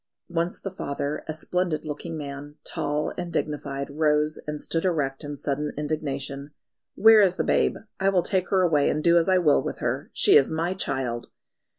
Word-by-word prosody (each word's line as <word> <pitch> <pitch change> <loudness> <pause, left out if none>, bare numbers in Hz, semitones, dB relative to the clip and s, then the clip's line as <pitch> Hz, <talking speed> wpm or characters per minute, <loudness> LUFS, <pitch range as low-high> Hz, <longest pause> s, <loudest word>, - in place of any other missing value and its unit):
Once 170 0 -1
the 195 - -5
father, 140 -4 -4
a - - -2
splendid 175 0 -1
looking 155 +2 -5
man, 145 0 -7
tall 150 +1 -2
and 175 -1 -4
dignified, 140 -3 -3
rose 150 0 +1
and 150 0 -3
stood 165 +2 -1
erect 150 -6 -1
in 145 0 -5
sudden 145 +1 -2
indignation. 140 -2 -3 0.5
"Where 220 0 +7
is 185 -3 +3
the - - 0
babe? - - +2 0.2
I 195 0 +3
will 185 -3 +2
take 185 -2 0
her 190 -2 +3
away 150 -5 +3
and 150 - -1
do 170 0 +5
as 170 - 0
I 185 - +5
will 160 -5 +4
with - - -4
her. - - -3
She - - +6
is 135 - +3
my 165 +3 -1
child!" 125 -9 -2
150 Hz, 190 wpm, -25 LUFS, 145-175 Hz, 0.5 s, Where